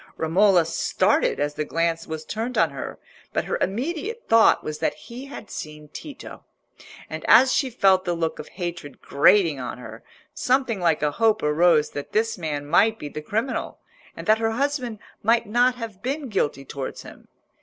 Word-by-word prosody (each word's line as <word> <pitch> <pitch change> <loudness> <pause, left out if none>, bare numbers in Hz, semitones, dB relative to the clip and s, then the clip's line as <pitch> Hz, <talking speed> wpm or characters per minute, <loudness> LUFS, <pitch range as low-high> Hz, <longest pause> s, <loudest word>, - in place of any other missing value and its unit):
Romola 175 +2 +4
started - - +1
as 145 0 -1
the 150 - -2
glance 165 +1 -1
was 160 0 -6
turned 230 +4 -4
on - - +3
her, - - -6 0.4
but - - 0
her - - -2
immediate 335 - -2
thought 225 0 +5
was 155 0 -5
that - - 0
he 240 - -10
had 275 -6 -10
seen 150 -1 -8
Tito. 285 - -10 0.6
And - - -7
as 260 0 +7
she 265 - +1
felt 195 -6 +3
the 175 -2 -1
look 165 -1 -2
of - - -7
hatred 170 -6 -6
grating 160 0 +4
on 125 -1 -5
her, 115 -2 -10 0.3
something 255 -6 0
like 165 -4 +1
a 150 - +2
hope 225 +4 +2
arose 155 +1 +3
that 145 - -7
this 225 +1 +1
man 150 -5 -4
might 210 +9 +3
be 145 - -7
the 155 - -6
criminal, 220 - -3 0.4
and - - -7
that 215 0 +4
her 225 0 0
husband 255 -3 -1 0.2
might 230 +2 +3
not 245 +4 +2
have 225 -5 -8
been 275 +3 -3
guilty 145 -9 -1
towards 135 -1 -6
him. - - -14
190 Hz, 180 wpm, -24 LUFS, 155-235 Hz, 0.6 s, as